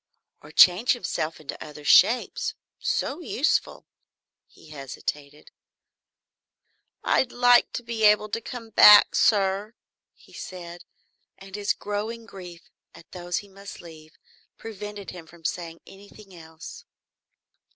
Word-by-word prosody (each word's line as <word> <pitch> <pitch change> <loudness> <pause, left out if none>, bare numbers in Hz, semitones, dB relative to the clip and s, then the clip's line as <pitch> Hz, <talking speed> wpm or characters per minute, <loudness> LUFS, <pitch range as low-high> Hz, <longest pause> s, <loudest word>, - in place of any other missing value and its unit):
Or - - -14
change 185 +7 +5
himself 165 -9 -4
in 155 - -19
other 150 -1 -11
shapes? 240 - +3 0.2
So 285 - -2
useful. 315 -3 -1 0.6
He 155 - -20
hesitated. 145 +1 -7 1.5
"I'd 255 - +1
like 245 0 +4
to 240 - -5
be 230 -1 -4
able 210 0 +4
to 230 +3 -4
come 230 -1 -9
back, 210 0 +8
sir," 200 +1 +1 0.4
he - - -22
said, 175 -1 -10 0.5
and 195 0 -11
his 205 -1 -1
growing 215 +3 -5
grief 180 -5 -12 0.3
at 165 - -17
those 175 -1 -4
he - - -18
must 200 +1 -12
leave 160 -2 -15 0.4
prevented 210 -2 -9
him 170 -3 -12
from 165 0 -19
saying 165 0 -5
anything 200 0 -16
else. 160 -2 -12
195 Hz, 120 wpm, -24 LUFS, 170-215 Hz, 1.5 s, back